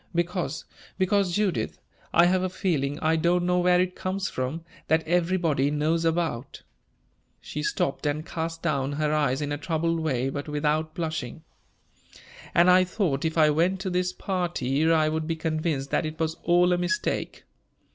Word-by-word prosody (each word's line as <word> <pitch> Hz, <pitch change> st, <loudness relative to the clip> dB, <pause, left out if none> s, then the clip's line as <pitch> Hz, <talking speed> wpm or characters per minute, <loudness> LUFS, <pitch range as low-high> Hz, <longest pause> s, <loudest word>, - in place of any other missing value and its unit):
"Because 170 Hz, -3 st, -2 dB, 0.3 s
because, 190 Hz, -1 st, +1 dB
Judith, 190 Hz, -, -1 dB, 0.3 s
I 170 Hz, -, +5 dB
have 185 Hz, +1 st, +3 dB
a 185 Hz, -, -1 dB
feeling 150 Hz, -6 st, -1 dB
I 160 Hz, 0 st, +2 dB
don't 175 Hz, +2 st, +2 dB
know 180 Hz, 0 st, +2 dB
where 180 Hz, 0 st, +4 dB
it 185 Hz, 0 st, 0 dB
comes 190 Hz, +1 st, -2 dB
from 135 Hz, +6 st, -3 dB, 0.2 s
that 160 Hz, 0 st, +2 dB
everybody 170 Hz, -5 st, +1 dB
knows 155 Hz, +3 st, 0 dB
about 160 Hz, -7 st, -2 dB, 0.4 s
" -, -, -42 dB, 0.3 s
She 150 Hz, -, -6 dB
stopped 150 Hz, -1 st, -1 dB
and 150 Hz, +2 st, -2 dB
cast 165 Hz, 0 st, -4 dB
down 140 Hz, -4 st, 0 dB
her 150 Hz, +1 st, 0 dB
eyes 145 Hz, -2 st, +1 dB
in 145 Hz, -, -3 dB
a 145 Hz, -, -2 dB
troubled 165 Hz, +1 st, -1 dB
way, 135 Hz, -5 st, 0 dB
but 145 Hz, +2 st, -5 dB
without 150 Hz, +1 st, -1 dB
blushing. 160 Hz, -4 st, -4 dB, 1.1 s
"And 170 Hz, +1 st, +6 dB
I 185 Hz, 0 st, +6 dB
thought 180 Hz, -7 st, -1 dB
if 160 Hz, +1 st, -1 dB
I 155 Hz, -1 st, +5 dB
went 175 Hz, +5 st, +1 dB
to 190 Hz, -1 st, -3 dB
this 180 Hz, 0 st, 0 dB
party 165 Hz, -6 st, 0 dB
I 155 Hz, -1 st, +4 dB
would 155 Hz, 0 st, -2 dB
be 165 Hz, -, -1 dB
convinced 155 Hz, -3 st, -2 dB
that 160 Hz, -, +1 dB
it 155 Hz, +1 st, -8 dB
was 160 Hz, -1 st, 0 dB
all 175 Hz, +1 st, +4 dB
a 175 Hz, -, +1 dB
mistake. 180 Hz, -, -2 dB
160 Hz, 175 wpm, -26 LUFS, 150-180 Hz, 1.1 s, And